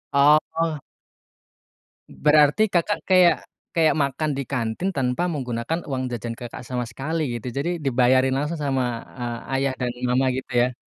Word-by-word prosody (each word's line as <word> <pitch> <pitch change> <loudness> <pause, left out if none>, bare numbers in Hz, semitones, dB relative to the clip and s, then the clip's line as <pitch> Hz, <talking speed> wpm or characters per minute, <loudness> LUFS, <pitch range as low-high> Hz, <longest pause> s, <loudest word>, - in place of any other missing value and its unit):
Oh. 155 +3 +3 1.3
Berarti 150 +4 +4
Kakak 190 +3 0
kayak 185 -2 +6 0.4
kayak 160 -3 +3
makan 140 +3 -1
di 140 - -1
kantin 120 +8 -1
tanpa 130 +2 0
menggunakan 125 +2 -2
uang 130 -2 -2
jajan 115 0 -4
Kakak, 120 0 -8
sama 125 -1 -2
sekali 135 +8 -3 0.2
gitu. 120 - -8
Jadi 145 +5 0
dibayarin 130 0 +3
langsung 150 +3 -2
sama, 135 -3 0 0.3
eee, 120 -1 -3 0.2
ayah 135 0 +1
dan 125 -1 -1
mama 125 +2 +2
gitu 130 - -6
ya? 120 +1 +2
135 Hz, 145 wpm, -23 LUFS, 125-155 Hz, 1.3 s, kayak